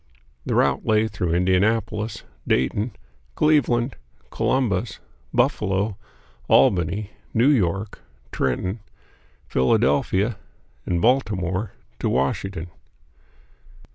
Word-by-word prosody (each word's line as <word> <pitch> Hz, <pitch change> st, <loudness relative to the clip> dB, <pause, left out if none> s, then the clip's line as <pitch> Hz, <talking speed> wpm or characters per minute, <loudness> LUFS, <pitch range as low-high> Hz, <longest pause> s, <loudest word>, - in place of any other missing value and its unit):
The -, -, 0 dB
route -, -, +2 dB
lay 110 Hz, 0 st, +2 dB
through 90 Hz, -5 st, -2 dB
Indianapolis, 105 Hz, +4 st, 0 dB, 0.2 s
Dayton, 100 Hz, -, 0 dB, 0.4 s
Cleveland, 135 Hz, -5 st, +2 dB, 0.3 s
Columbus, 115 Hz, -6 st, 0 dB, 0.3 s
Buffalo, 100 Hz, +1 st, +1 dB, 0.5 s
Albany, 90 Hz, +8 st, +3 dB, 0.2 s
New 120 Hz, +5 st, +5 dB
York, 100 Hz, -, 0 dB, 0.3 s
Trenton, 90 Hz, -, -1 dB, 0.7 s
Philadelphia, 95 Hz, -, +1 dB, 0.5 s
and 85 Hz, -2 st, 0 dB
Baltimore, 105 Hz, -6 st, +1 dB, 0.3 s
to -, -, 0 dB
Washington. 85 Hz, +6 st, -1 dB
100 Hz, 75 wpm, -23 LUFS, 90-110 Hz, 0.7 s, New